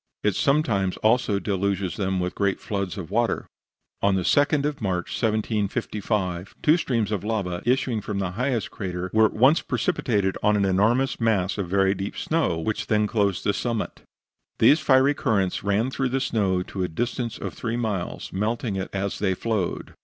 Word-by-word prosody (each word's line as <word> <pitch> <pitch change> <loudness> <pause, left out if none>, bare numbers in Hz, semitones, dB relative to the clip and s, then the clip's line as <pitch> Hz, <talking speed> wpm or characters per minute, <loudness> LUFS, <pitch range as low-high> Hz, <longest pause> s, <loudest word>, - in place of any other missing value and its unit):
It 105 - +2
sometimes 115 - +1
also 110 -2 +2
deluges 100 -2 -1
them 95 -2 -1
with 90 0 -2
great 100 -2 0
floods 100 -3 -3
of 95 -2 -7
water. 115 +2 +1 0.6
On 100 -1 +3
the 95 - 0
2d 145 - +3
of 145 -3 -2
March, 90 -4 -1
1755, 105 -4 -1
two 155 - +6
streams 115 - -1
of 100 -3 -2
lava, 100 -5 -2
issuing 125 -3 +1
from 105 0 -4
the 95 -2 -1
highest 120 +2 -1
crater, 90 -1 -4
were 110 0 +5
at - - -8
once 130 +8 +4
precipitated 105 - 0
on 105 0 +3
an 100 - +2
enormous 110 +8 +2
mass 100 -4 +1
of 95 -3 -3
very 95 0 +3
deep 100 +1 -5
snow, 155 - 0
which 100 +6 -2
then 105 -1 +2
clothed 100 -3 0
the 100 - +1
summit. 115 -1 -3 0.6
These 150 - +6
fiery 135 -1 +4
currents 100 -10 0
ran 105 +6 +1
through 135 -1 -1
the 135 +2 0
snow 100 -8 0
to 95 - -6
a - - 0
distance 120 +5 -3
of - - -5
three 115 0 -3
miles, 105 -7 -3
melting 105 +1 -1
it 95 - -3
as 100 0 -3
they 95 -2 +1
flowed. 105 -3 -2
105 Hz, 180 wpm, -24 LUFS, 95-120 Hz, 0.6 s, two